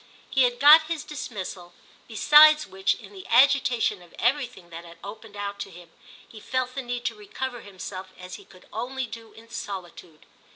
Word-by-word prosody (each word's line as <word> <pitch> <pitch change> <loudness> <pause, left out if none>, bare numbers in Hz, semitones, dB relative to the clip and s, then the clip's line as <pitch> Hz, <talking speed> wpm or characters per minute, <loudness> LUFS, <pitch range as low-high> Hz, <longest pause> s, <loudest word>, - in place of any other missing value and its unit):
He 265 -2 +4
had 245 0 -1
got 310 +3 +8
his 325 -2 -3
dismissal; 190 -10 -7 0.3
besides 300 +6 +6
which, 195 +1 0
in 205 -3 -14
the 190 -2 -11
agitation 245 -5 +3
of 175 - -17
everything 245 -8 -1
that 165 +1 -8
had 170 0 -14
opened 210 +1 -10
out 200 0 -5
to 200 - -5
him, 175 -2 -14 0.4
he 220 - -13
felt 255 +3 -2
the 270 - -4
need 245 -1 -5
to - - 0
recover 235 +4 -6
himself 185 -1 -9
as 180 0 -10
he - - -10
could 185 - -19
only 255 +4 -3
do 225 -1 -11
in 225 +1 -16
solitude. 175 -6 -8
225 Hz, 180 wpm, -25 LUFS, 190-255 Hz, 0.4 s, got